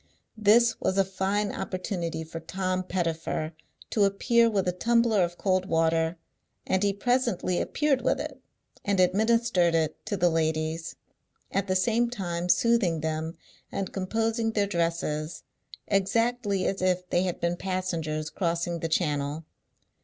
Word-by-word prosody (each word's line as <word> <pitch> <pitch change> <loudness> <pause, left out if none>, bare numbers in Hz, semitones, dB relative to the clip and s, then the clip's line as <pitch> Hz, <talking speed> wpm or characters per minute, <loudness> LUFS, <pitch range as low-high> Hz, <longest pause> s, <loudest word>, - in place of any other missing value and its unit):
This 225 +2 +4
was 190 - 0
a 195 - +4
fine 195 +2 -1
opportunity 180 -4 -3
for 165 +1 -7
Tom 185 +2 -2
Pettifer 165 -3 -2 0.4
to 210 - +3
appear 230 +4 +3
with 195 -4 0
a - - +3
tumbler 230 +1 +2
of 175 0 -3
cold 185 -1 +1
water, 165 0 +1 0.5
and 190 - +1
he 205 -1 +3
presently 230 -4 0
appeared 285 -3 +1
with 250 - +1
it, - - -6 0.4
and 200 -2 0
administered 200 -2 +3
it 160 -1 -1
to 205 -2 -1
the 175 -1 +3
ladies; 160 0 -1 0.6
at 195 0 0
the 185 - +1
same 230 +5 +2
time 180 -6 -3
soothing 200 -8 +3
them, 160 +1 -3 0.3
and 195 -2 -3
composing 225 +4 -1
their 205 -2 +2
dresses, 165 -4 -2 0.4
exactly 205 0 +1
as 195 - -1
if 185 -1 +1
they 175 - +3
had 180 -2 -2
been 170 0 0
passengers 170 -5 -3
crossing 170 -1 -1
the 165 - -3
Channel. 150 -1 -1
185 Hz, 145 wpm, -27 LUFS, 165-205 Hz, 0.6 s, This